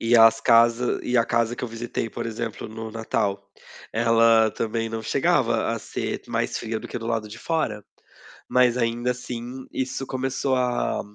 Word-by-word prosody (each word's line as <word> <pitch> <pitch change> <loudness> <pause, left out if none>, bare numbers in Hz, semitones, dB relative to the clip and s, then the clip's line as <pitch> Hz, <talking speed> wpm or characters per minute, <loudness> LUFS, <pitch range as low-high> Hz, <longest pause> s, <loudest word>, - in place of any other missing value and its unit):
E 115 +1 +4
as 115 0 +7
casa 115 +1 +4
e 125 - 0
a 115 - +4
casa 115 +1 0
que - - -8
eu - - -4
visitei, 115 0 -4
por 120 -1 -4
exemplo, 115 0 -5
no 110 0 -7
Natal, 100 -3 -2 0.4
ela 115 -1 +4
também 115 +1 -2
não 110 0 -4
chegava - - +1
a - - -2
ser - - -4
mais - - -1
fria 110 0 -3
do - - -9
que - - -4
do 115 - -6
lado 115 -2 -1
de 110 +2 -10
fora. 115 -11 -2 0.6
Mas, 125 -1 +3
ainda 120 +1 0
assim, 125 +1 -6
isso 130 +1 -3
começou 130 +1 -1
a 125 -1 0
115 Hz, 180 wpm, -24 LUFS, 115-125 Hz, 0.6 s, as